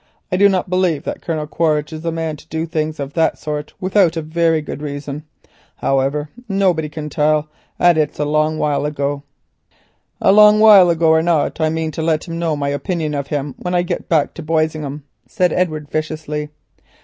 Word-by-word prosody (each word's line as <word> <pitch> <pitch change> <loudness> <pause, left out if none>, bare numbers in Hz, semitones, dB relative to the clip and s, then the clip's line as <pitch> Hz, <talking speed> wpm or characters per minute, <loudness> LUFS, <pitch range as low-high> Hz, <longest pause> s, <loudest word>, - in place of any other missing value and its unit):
I - - +1
do 200 +1 +6
not 190 -2 0
believe 180 -5 0
that - - -5
Colonel 155 -3 -3
Quaritch 155 -1 0
is 155 - -6
the 165 0 -2
man 160 -1 -3
to - - -17
do 160 +1 -3
things 155 -2 -3
of 140 0 -5
that 165 -1 +1
sort 150 -1 -5
without 185 -3 +2
a 160 - -2
very 165 +1 +1
good 150 -1 -7
reason. 145 0 -6 0.5
However, 135 +2 0 0.2
nobody 185 -6 +1
can 150 0 -6
tell, 150 0 +1 0.3
and 175 -2 +4
it 150 -1 +2
is - - -23
a 150 - -1
long 155 +1 +1
while 145 -1 0
ago." 145 -1 -2 1.0
"A - - +4
long 210 +1 +7
while 205 -5 +8
ago 165 -1 +2
or 160 0 +5
not 165 -1 0
I 155 - +2
mean 160 0 -2
to 160 - -5
let 160 +1 0
him 165 0 -5
know 165 -2 0
my 140 -1 -2
opinion 155 +1 -2
of 140 -1 -3
him 145 -2 -3
when 180 0 -3
I 175 - +2
get 175 - -4
back 155 -4 +2
to - - -8
Boisingham," 155 -2 -2 0.2
said 180 -1 +1
Edward 155 -5 -1
viciously. 155 -1 -3
155 Hz, 200 wpm, -18 LUFS, 150-170 Hz, 1.0 s, while